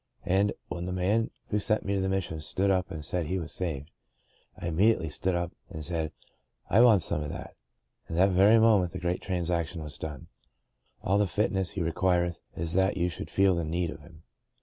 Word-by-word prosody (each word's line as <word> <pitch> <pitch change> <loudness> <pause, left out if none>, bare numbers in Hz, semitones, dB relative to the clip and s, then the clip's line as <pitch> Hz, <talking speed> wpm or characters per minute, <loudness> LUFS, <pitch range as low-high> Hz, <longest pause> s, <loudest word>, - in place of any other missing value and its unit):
And, 100 +2 +2
when 90 0 -4
the - - -3
man 100 +5 +1 0.2
who 105 - +1
sent 110 +1 0
me 100 - 0
to 100 - +1
the 95 - 0
Mis 95 0 +1
sion 80 -2 -6
stood 95 +6 0
up 90 -1 +1
and 75 -2 -6
said 85 +2 -2
he 95 - -1
was 85 -3 -5
saved, 80 -4 -4 0.7
I - - -7
im 80 - -4
mediately 95 -5 +3
stood 90 +4 -1
up 85 0 -2 0.2
and 80 -1 -6
said, 80 -2 -2 0.3
* - - -39
I 110 - +6
want 110 -7 +6
some 75 - 0
of 75 - -4
that,' - - -7 0.5
and 80 - -4
that 95 +2 +5
very 100 +5 +6
moment 105 -6 +4
the - - -4
great 90 0 -1
transaction 85 -2 -2
was 75 -1 -8
done. 75 -4 -6 0.8
*A11 100 - +3
the 105 - +3
fitness 95 -2 0
He 90 - -3
requireth 85 +1 +1
is 80 0 -1
that 95 +1 +2
you 90 0 +1
should 80 -2 -7
feel 95 +2 +3
the 85 -1 -1
need 85 +1 -1
of - - -9
Him.' 80 +1 -16
90 Hz, 220 wpm, -28 LUFS, 80-95 Hz, 0.8 s, I